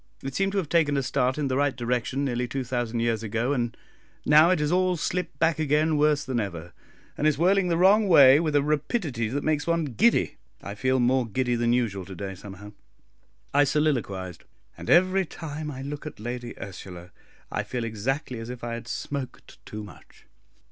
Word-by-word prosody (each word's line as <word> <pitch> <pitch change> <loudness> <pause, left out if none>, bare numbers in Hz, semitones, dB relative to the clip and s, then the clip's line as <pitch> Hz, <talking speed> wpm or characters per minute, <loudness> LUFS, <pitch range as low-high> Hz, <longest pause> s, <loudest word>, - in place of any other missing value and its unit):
It 135 0 -5
seemed 195 +4 0
to - - -1
have 185 -5 0
taken 150 -3 +2
a 135 - 0
start 125 +1 0
in 150 -2 -1
the 130 0 -1
right 140 -1 +1
direction 125 +3 -1
nearly 125 -2 -1
two 135 +2 -3
thousand 120 -2 -2
years 115 -2 0
ago, 115 +5 -1
and 120 -3 -2 0.5
now 155 +3 +6
it 185 - +3
has 150 0 0
all 185 0 +2
slipped 165 -2 -3
back 165 +1 +1
again 155 +1 +2
worse 150 -1 +2
than 130 -2 -1
ever, 85 -5 -5 0.4
and 150 - +1
is 150 -3 +2
whirling 185 +3 +3
the 170 -1 +1
wrong 200 +4 +5
way 140 -5 +8
with 155 -3 -1
a 145 - +4
rapidity 150 - -1
that 140 +6 -3
makes 155 -1 0
one 170 -1 +1
giddy. 205 - +2 0.2
I 100 - -7
feel 130 +5 0
more 125 0 +2
giddy 125 +3 -1
than 120 0 +1
usual 110 -6 0
to 95 - -9
day, 95 +2 -5
somehow," 100 +2 -11 0.8
I 145 +1 +5
soliloquised; 115 - -1 0.3
"and - - -9
every 185 +2 +4
time 155 -3 -6
I 135 -2 -7
look 145 +2 -6
at 150 - -9
Lady 120 +1 -6
Ursula, 90 -2 -9 0.4
I - - -1
feel 125 -2 -4
exactly 115 +3 -3
as 115 +1 -7
if 125 -1 -8
I 120 -1 -3
had 115 0 -7
smoked 135 +1 -6
too 105 0 -6
much. 105 - -15
135 Hz, 200 wpm, -26 LUFS, 115-155 Hz, 0.8 s, way